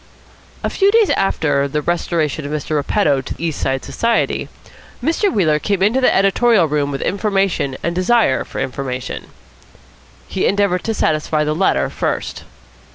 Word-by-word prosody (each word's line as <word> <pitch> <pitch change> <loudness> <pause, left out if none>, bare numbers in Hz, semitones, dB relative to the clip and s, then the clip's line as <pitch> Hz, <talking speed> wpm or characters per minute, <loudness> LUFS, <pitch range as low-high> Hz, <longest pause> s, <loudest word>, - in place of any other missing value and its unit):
A - - 0
few 395 0 +3
days 440 -1 +4
after 145 -7 +1
the 150 +1 -2
restoration 165 -3 -1
of 145 - -5
Mr. 150 0 -3
Repetto 145 -1 +1
to - - -7
East 165 -3 -3
Side 135 0 -1
Society, 230 0 0 0.5
Mr. 335 - +1
Wheeler 155 -7 +2
came 195 +3 0
into 230 +6 +2
the 255 - +4
editorial 195 -1 +3
room 145 -1 0
with 140 -1 -3
information 195 -9 0
and 170 - -1
desire 185 - +2
for - - -10
information. 130 -1 -4 1.0
He 190 - 0
endeavoured 195 -2 +1
to 225 - -1
satisfy 155 -2 0
the 150 0 0
latter 185 +5 +1
first. - - -3
170 Hz, 155 wpm, -18 LUFS, 150-205 Hz, 1.0 s, days